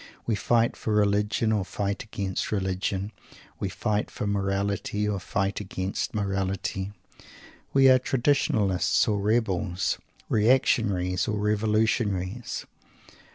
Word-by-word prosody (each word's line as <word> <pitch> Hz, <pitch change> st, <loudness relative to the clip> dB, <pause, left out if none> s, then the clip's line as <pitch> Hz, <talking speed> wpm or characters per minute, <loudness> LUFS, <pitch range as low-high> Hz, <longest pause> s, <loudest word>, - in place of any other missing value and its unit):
We 115 Hz, -, 0 dB
fight 115 Hz, +3 st, +2 dB
for 110 Hz, -, -2 dB
Religion 105 Hz, +2 st, +2 dB
or 105 Hz, -3 st, +1 dB
fight 100 Hz, +1 st, -3 dB
against 100 Hz, -4 st, -3 dB
Religion. 95 Hz, 0 st, -1 dB, 0.5 s
We 100 Hz, -, -2 dB
fight 105 Hz, +2 st, -1 dB
for -, -, -5 dB
Morality 100 Hz, +1 st, -1 dB
or 100 Hz, -2 st, -1 dB
fight 95 Hz, +2 st, -1 dB
against 95 Hz, 0 st, -3 dB
Morality. 95 Hz, -1 st, -2 dB, 0.8 s
We 135 Hz, -1 st, +6 dB
are 130 Hz, -1 st, +7 dB
Traditionalists 120 Hz, -8 st, +2 dB
or 105 Hz, -2 st, +1 dB
Rebels, 100 Hz, -4 st, 0 dB, 0.3 s
Reactionaries 105 Hz, -6 st, +2 dB
or 105 Hz, -, -1 dB
Revolutionaries. 105 Hz, 0 st, 0 dB
105 Hz, 110 wpm, -26 LUFS, 95-110 Hz, 0.8 s, are